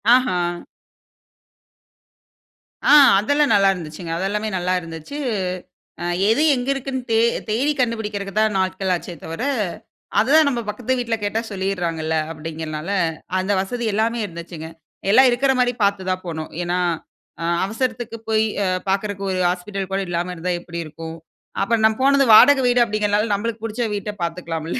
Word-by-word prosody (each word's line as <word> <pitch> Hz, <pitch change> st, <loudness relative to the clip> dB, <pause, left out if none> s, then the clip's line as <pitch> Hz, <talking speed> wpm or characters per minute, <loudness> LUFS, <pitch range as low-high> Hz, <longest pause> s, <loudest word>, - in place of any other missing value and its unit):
ஆஹா! 250 Hz, -9 st, +1 dB, 2.4 s
ஆ, -, -, +1 dB, 0.3 s
அதெல்லாம் 285 Hz, +5 st, +2 dB
நல்லா 195 Hz, -1 st, +5 dB
இருந்துச்சுங்க. 165 Hz, -1 st, -7 dB
அது 185 Hz, -, -2 dB
எல்லாமே 210 Hz, +1 st, -2 dB
நல்லா 180 Hz, +1 st, 0 dB
இருந்துச்சு. 165 Hz, -, -8 dB, 0.8 s
அ -, -, -3 dB, 0.2 s
எது 230 Hz, +7 st, +3 dB
எங்கு 250 Hz, +1 st, -3 dB
இருக்குனு 265 Hz, -1 st, -4 dB
தே 225 Hz, -, +4 dB, 0.3 s
தேடி 260 Hz, +8 st, +1 dB
கண்டுபிடிக்கிறதுக்கு 215 Hz, -4 st, -1 dB
தான் 215 Hz, -1 st, +2 dB
நாட்கள் 190 Hz, 0 st, -1 dB
ஆச்சே 175 Hz, -, -6 dB
தவிர, 165 Hz, +9 st, -5 dB, 0.8 s
அதுதான் 285 Hz, +6 st, +5 dB
நம்ம 240 Hz, -3 st, -2 dB
பக்கத்து 250 Hz, +4 st, -1 dB
வீட்ல 235 Hz, -2 st, -1 dB
கேட்டா 205 Hz, +2 st, -1 dB
சொல்லிறாங்கள்ல 175 Hz, -5 st, -2 dB, 0.2 s
அப்டிங்கிறனால, 155 Hz, +1 st, -6 dB, 0.5 s
அந்த 190 Hz, +2 st, -1 dB
வசதி 240 Hz, +4 st, -4 dB
எல்லாமே 230 Hz, +2 st, 0 dB
இருந்துச்சுங்க. 170 Hz, -3 st, -8 dB, 0.4 s
எல்லாம் 255 Hz, +3 st, +7 dB
இருக்கிற 265 Hz, +3 st, +2 dB
மாரி 245 Hz, 0 st, +2 dB
பார்த்து 200 Hz, -2 st, +1 dB
தான் 185 Hz, 0 st, -3 dB
போனோம். 160 Hz, -2 st, -5 dB
ஏன்னா, 175 Hz, +1 st, -1 dB, 0.6 s
அ -, -, -3 dB, 0.2 s
அவசரத்துக்கு 230 Hz, +1 st, -3 dB
போய் 220 Hz, 0 st, +3 dB, 0.5 s
பாக்கறதுக்கு 195 Hz, 0 st, -1 dB
ஒரு 185 Hz, -, -1 dB
ஹாஸ்பிட்டல் 190 Hz, +2 st, -4 dB
கூட 195 Hz, -, 0 dB
இல்லாம 175 Hz, +1 st, -2 dB
இருந்தா 180 Hz, +2 st, -2 dB
எப்டி 170 Hz, -1 st, -7 dB
இருக்கும்? 160 Hz, +1 st, -8 dB, 0.4 s
அப்புறம் 220 Hz, +2 st, +1 dB
நா -, -, +7 dB
போனது 275 Hz, 0 st, +5 dB
வாடகை 270 Hz, +4 st, +8 dB
வீடு 245 Hz, 0 st, +3 dB
அப்டிங்கிறனால 210 Hz, 0 st, 0 dB
நம்ளுக்கு 225 Hz, +2 st, -3 dB
புடுச்ச 225 Hz, +2 st, -3 dB
வீட்ட 205 Hz, +1 st, -4 dB
பார்த்துக்கலாமில்ல. 165 Hz, +2 st, -3 dB
205 Hz, 145 wpm, -21 LUFS, 175-230 Hz, 2.4 s, வாடகை